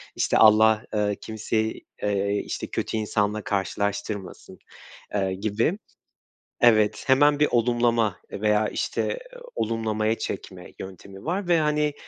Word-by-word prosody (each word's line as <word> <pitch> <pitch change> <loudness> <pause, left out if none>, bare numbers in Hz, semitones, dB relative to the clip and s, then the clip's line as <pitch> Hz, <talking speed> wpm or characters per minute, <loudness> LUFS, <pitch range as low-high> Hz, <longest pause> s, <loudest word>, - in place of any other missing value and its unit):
İşte, - - +1
Allah, 110 +1 +6
eee, 105 -1 +1
kimseyi, 110 0 -2 0.2
eee, 100 0 0
işte, - - -4
kötü 110 - -3
insanla 105 0 0
karşılaştırmasın, 100 -1 -3 0.5
eee, 95 -2 0
gibi. 110 - 0 0.8
Evet, 110 -3 +4
hemen 145 +2 +5
bir 150 - +4
olumlama 120 -3 +2
veya, 105 0 +1
işte, - - -2 0.4
olumlamaya 110 -1 -1
çekme - - -6
yöntemi 95 +1 -10
var 180 +3 -2
ve, 170 -1 +4
hani, 150 -1 +1
110 Hz, 115 wpm, -25 LUFS, 105-120 Hz, 0.8 s, Allah